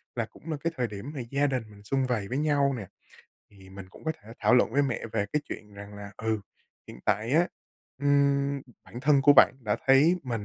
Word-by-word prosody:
là 115 -2 -1
cũng 160 +8 -10
là 155 - -2
cái 165 0 -1
thời 125 - 0
điểm 105 +6 -7
mà - - -4
gia 140 +1 +2
đình 130 -4 -1
mình 100 0 -16
sum 135 +5 0
vầy 115 -6 -1
với 130 - -3
nhau 145 -2 +2
nè, 100 -4 -7 0.6
thì 95 -2 -17
mình 95 -1 -10
cũng - - -16
có 160 - 0
thể 105 - -17
thảo - - +4
luận 125 -2 +3
với 140 +3 +3
mẹ 125 -4 -2
về 105 -2 0
cái 150 - +1
chuyện 105 -1 -8
rằng 100 +1 -10
là, 100 0 -8
ừ, 110 -1 -1 0.5
hiện 60 - -11
tại 105 +3 +1
á, 170 +4 +4 0.5
ừm, 140 -1 +2 0.2
bản 120 - -9
thân 140 0 +4
của 145 +1 +8
bạn - - +7
đã 105 -4 -1
thấy 140 +6 +6
mình 115 -6 -4
125 Hz, 235 wpm, -28 LUFS, 105-140 Hz, 0.6 s, của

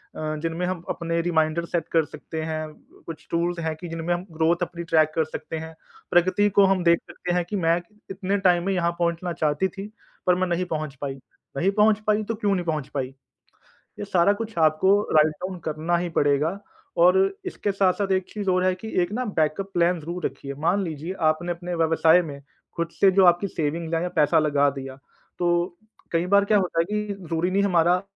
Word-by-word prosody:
अ, 155 0 -3
जिनमें 165 +2 -2
हम 180 -2 -3
अपने 170 -1 -2
रिमाइंडर 165 -1 +1
सेट 170 -1 -2
कर 165 -2 +3
सकते 160 +2 -7
हैं 155 0 -3
ब - - -24
कुछ 165 -2 -9
टूल्स 170 +1 0
हैं, 160 -1 -2
जिनमें 165 +1 -2
हम 175 +1 -4
ग्रोथ 160 +1 +2
अपनी 170 -1 -5
ट्रैक 155 -2 +3
कर 160 - +2
सकते 160 +1 -6
हैं। 160 0 -7 0.4
प्रगति 185 +4 +3
को 200 +1 +4
हम 190 -2 +2
देख 170 0 +4
सकते 175 -1 -4
हैं 180 - +1
कि 205 - -5
मैं 165 -3 +2
इ - - -4 0.3
इतने 195 +1 -1
टाइम 175 -1 +3
में 195 - +1
यहाँ 170 -2 +1
पहुँचना 170 +1 -1
चाहती 150 +4 0
थी 195 +2 -8 0.4
पर 180 - +5
मैं 185 0 0
नहीं 175 +1 -1
पहुँच 155 -4 -4
पाई, 140 -2 -3 0.4
नहीं 190 +7 +2
पहुँच 210 +1 +3
पाई 215 0 +2
तो 225 +1 -3
क्यों 205 -2 0
नहीं 180 -2 -2
पहुँच 155 -4 -2
पाई? 135 -3 -1 0.9
ये - - -4
सारा 195 0 +3
कुछ 220 0 -6
आपको 160 +6 +4 0.2
राइट 155 0 +5
डाउन 185 -1 -4
करना 160 +3 -1
ही 175 0 -2
पड़ेगा 145 +6 +2 0.5
और 180 +1 +6 0.3
इसके 205 - -2
साथ-साथ 195 0 +1
एक 185 -1 +1
चीज़ 205 -3 -2
और 185 0 +2
है 185 0 +2
कि 205 +4 -9
एक 175 +4 -3
ना 250 +3 -1
बैकअप 160 +6 0
प्लान 175 0 +2
ज़रूर 170 +3 -6
रखिए। 140 0 -6
मान 190 +4 +2
लीजिए 165 +1 -4 0.2
आपने 175 +3 -2
अपने 175 +1 -5
व्यवसाय 165 +1 +4
में 145 -4 -8 0.4
खुद 170 -1 -1
से 195 - +7
जो 190 0 +4
आपकी 175 +3 +4
सेविंग 165 0 -2
है 165 - 0
या 180 - -1
पैसा 150 +2 +4
लगा 145 -2 +3
दिया, 135 -1 -8 0.4
तो 175 0 0 0.4
कई 165 +1 +1
बार 200 +2 +4
क्या 210 0 +3
होता 180 -3 0
है 165 - +3
कि 210 -1 -2
ज़रूरी 165 +3 0
नहीं 200 +2 +2
हमारा 180 -1 +3
175 Hz, 210 wpm, -24 LUFS, 160-185 Hz, 0.9 s, से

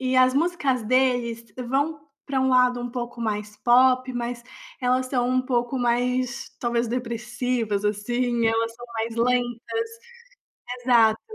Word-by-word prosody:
e 255 0 0
as 255 0 +5
músicas 285 -5 +1
deles 245 -1 +1 0.2
vão 285 +5 0 0.2
pra 270 -2 -1
um 265 - +2
lado 250 -1 +3
um 245 - -4
pouco 240 -1 -6
mais 210 -1 -3
pop, 255 +3 +4
mas 240 0 -4 0.4
elas 255 0 +2
são 250 -2 0
um 255 0 +2
pouco 245 0 -1
mais, 250 +2 0
talvez, 235 -1 0
depressivas, 235 -2 -2
assim, 235 +3 0
elas 225 0 0
são 240 +1 -11
mais 225 0 -2
lentas, 245 - 0 0.9
exato. 230 -3 +4
245 Hz, 140 wpm, -24 LUFS, 235-255 Hz, 0.9 s, as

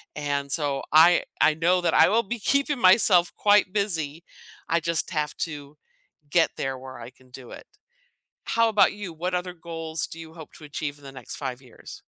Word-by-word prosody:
and 145 -1 -3
so 145 -2 -1
I 170 +3 +6 0.2
I 155 - +4
know 175 +3 +2
that 175 - 0
I 160 - +6
will 225 +5 +2
be 235 +4 -5
keeping 280 +4 0
myself 185 -3 +4
quite 205 -2 +3
busy. 170 -6 -2 0.5
I 170 +1 +2
just 165 0 -2
have 150 -2 -2
to 145 -2 -5 0.5
get 165 +1 +3
there 135 -1 -3
where 130 -1 -11
I 115 - -9
can 130 0 -25
do 125 -1 -12
it. - - -11 0.8
How 230 0 +2
about 205 -2 +3
you? 205 -4 -7
What 180 +3 -4
other 180 0 -3
goals 165 -2 -5
do 165 - -11
you 160 -1 -11
hope 160 -2 -12
to 155 - -13
achieve 145 0 -5
in 145 - -19
the 135 - -10
next 130 -3 -9
5 130 -2 -5
years? 125 - -13
165 Hz, 195 wpm, -25 LUFS, 145-180 Hz, 0.8 s, I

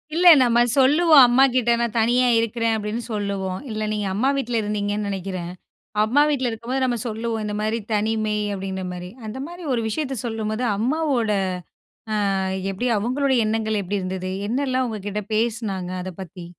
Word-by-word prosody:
இல்ல 355 +1 +4
நம்ம 240 -1 +4 0.2
சொல்லுவோம் 290 +2 +6
அம்மாகிட்ட, 250 -1 +3
"நான் 235 -1 -1
தனியா 245 +3 +3
இருக்கிறேன்" 230 0 0
அப்படின்னு, 215 +2 -3
சொல்லுவோம். 200 -3 -2
இல்ல 215 0 -2
நீங்க 210 -1 -2
அம்மா 245 +8 +1
வீட்டில 245 -4 -1
இருந்தீங்கன்னு 205 0 -2
நெனைக்கிறேன். 185 -2 -4 0.5
அம்மா 250 +7 +3
வீட்டில 260 -4 0
இருக்கும்போது 235 +4 -3
நம்ம 245 -2 0
சொல்லுவோம், 225 0 -3
இந்த 210 - -3
மாரி, 220 +2 -1
"தனிமை" 215 0 0 0.2
அப்டின்ற 190 -1 -4
மாரி. 180 0 -7 0.2
அந்த 215 +5 -6
மாரி 350 +1 -10
ஒரு 230 - 0
விஷயத்த 270 +2 -3
சொல்லும்போது, 220 +1 -2
அம்மாவோட 255 -2 0 0.8
ஆ - - +1 0.6
எப்டி? 195 +6 -3
அவுங்களுடைய 260 +4 +1
எண்ணங்கள் 220 -1 0
எப்டி 195 +2 -2
இருந்தது, 185 0 -4 0.2
என்னலாம் 260 +1 0
உங்ககிட்ட 210 -1 -4
பேசினாங்?க 215 -5 -1
அத 185 - -5
பத்தி? 180 -1 -9
225 Hz, 150 wpm, -22 LUFS, 205-250 Hz, 0.8 s, சொல்லுவோம்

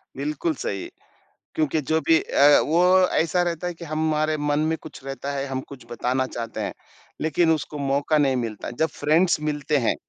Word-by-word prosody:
बिल्कुल 150 +4 -2
सही, 100 -6 -4 0.7
क्योंकि 155 0 +1
जो 160 +4 +1
भी 165 -1 +6
अ, 145 +1 +5
वो 170 +4 +3 0.4
ऐसा 170 +2 +1
रहता 175 0 -2
है 175 - -3
कि 170 0 -10
हमारे 155 0 0
मन 145 0 0
में 160 - 0
कुछ 155 - -11
रहता 135 +1 -5
है, 140 0 -2
हम 130 -1 -3
कुछ 135 -2 -11
बताना 125 +3 0
चाहते 115 -2 -6
हैं, - - -3 0.5
लेकिन 160 +2 +2
उसको 150 -1 -2
मौका 140 +3 +1
नहीं 135 -3 +2
मिलता, 115 -4 -4
जब 160 +7 0
फ्रेंड्स 160 +4 +3
मिलते 150 -1 0
हैं। 120 -5 +1
150 Hz, 185 wpm, -24 LUFS, 135-160 Hz, 0.7 s, भी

